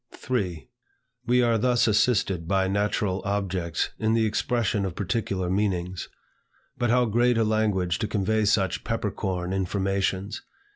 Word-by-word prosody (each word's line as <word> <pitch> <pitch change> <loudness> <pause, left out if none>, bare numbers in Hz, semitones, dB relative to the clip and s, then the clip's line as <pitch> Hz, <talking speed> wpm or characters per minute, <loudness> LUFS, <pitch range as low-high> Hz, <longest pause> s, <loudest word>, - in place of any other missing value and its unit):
3. 95 -10 -3 0.6
We 125 +1 +4
are 115 -1 +2
thus 120 0 +3
assisted 100 -6 +2
by 95 0 +2
natural 100 -1 0
objects 95 -4 -1
in 110 0 +1
the 115 -1 +3
expression 110 -1 0
of 95 -3 -3
particular 100 -2 -2
meanings. 95 -2 -1 0.7
But 120 - 0
how 125 +1 +4
great 120 +2 +2
a 115 - +3
language 105 -5 +1
to 110 - -1
convey 105 +1 0
such 100 -3 +1
pepper - - -2
corn 90 -1 -3
informations! 95 +1 -1
100 Hz, 140 wpm, -26 LUFS, 95-110 Hz, 0.7 s, We